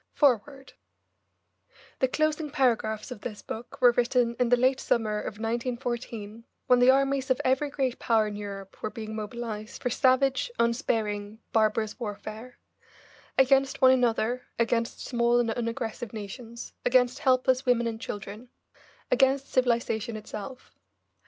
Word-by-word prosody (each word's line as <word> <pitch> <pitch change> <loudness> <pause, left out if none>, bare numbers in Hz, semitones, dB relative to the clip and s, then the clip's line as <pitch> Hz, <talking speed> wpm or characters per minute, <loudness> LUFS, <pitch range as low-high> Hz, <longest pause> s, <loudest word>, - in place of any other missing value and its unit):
FOREWORD 270 0 +1 1.3
The 260 - +3
closing 310 +2 0
paragraphs 230 -6 0
of 225 -4 -7
this 215 -4 -7
book 230 +2 -8
were 245 - +8
written 240 0 +1
in 250 -1 +2
the 245 - +5
late 260 +2 +2
summer 215 -2 0
of 210 - -5
1914, 230 -1 -4 0.2
when 250 -1 +5
the 245 +1 +6
armies 275 0 +2
of 260 - +2
every 265 +3 +2
great 265 -3 -2
power 225 -3 +2
in 210 -1 -4
Europe 200 -2 -8
were - - -2
being 220 -1 -7
mobilised 215 0 -6
for 250 - 0
savage, 265 - +2
unsparing, 220 -4 -1 0.2
barbarous 215 +1 +1
warfare 220 +2 -7 0.8
against 270 +1 +3
one 260 -1 +7
another, 245 -1 +1
against 230 0 0
small 240 -1 +2
and 235 -2 +1
unaggressive 230 -1 -4
nations, 225 +3 -8
against 250 0 +3
helpless 260 -1 +2
women 240 -1 +3
and 225 -1 -3
children, 210 +4 -7 0.6
against 270 0 +2
civilisation 235 -3 +1
itself. 215 +4 -8
240 Hz, 135 wpm, -27 LUFS, 220-260 Hz, 1.3 s, were